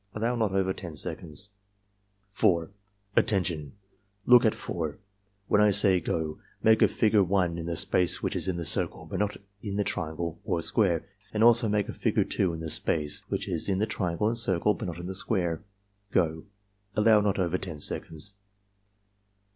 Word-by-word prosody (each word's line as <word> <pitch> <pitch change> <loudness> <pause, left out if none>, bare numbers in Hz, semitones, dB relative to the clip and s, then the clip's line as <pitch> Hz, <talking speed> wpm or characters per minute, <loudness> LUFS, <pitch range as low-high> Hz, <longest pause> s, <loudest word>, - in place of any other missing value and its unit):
(Allow 115 +3 0
not 110 -4 0
over 95 -1 +1
10 85 -5 -8
seconds.) 80 +6 -3 0.8
4. 85 -4 +2 0.4
"Attention! 85 -8 +1 0.5
Look 125 -1 +7
at 110 - +3
4. 80 -4 -4 0.5
When 105 - +4
I 105 - +6
say 100 -2 +3
'go' 80 -2 -3 0.2
make 110 0 +5
a - - +7
figure 105 -2 +3
1 90 -2 0
in 85 - -5
the 85 - -2
space 90 +2 +1
which - - -1
is - - -1
in 90 -2 -1
the 85 - -4
circle - - -2
but - - -4
not 105 0 -1 0.2
in 100 -2 -4
the 105 - +1
triangle 85 -1 -3
or 85 - -1
square, 90 -1 +1 0.3
and 105 - +3
also 115 -1 +6
make 105 -1 +1
a - - -5
figure - - +1
2 95 -3 0
in 80 -1 -6
the 80 - -4
space 75 -1 0
which - - -2
is 85 +3 -2
in 95 - +1
the 105 - +1
triangle 90 -2 -1
and 115 +1 0
circle, 100 -1 +2
but - - -5
not 85 - -5
in 85 - -7
the 95 - -4
square. 90 -4 -1 0.3
— 100 0 -43
Go!" 80 -2 0 0.5
(Allow 105 0 +5
not 100 -1 +1
over 90 -1 0
10 85 -5 -7
seconds.) 80 +6 -2
95 Hz, 185 wpm, -28 LUFS, 85-105 Hz, 0.8 s, Look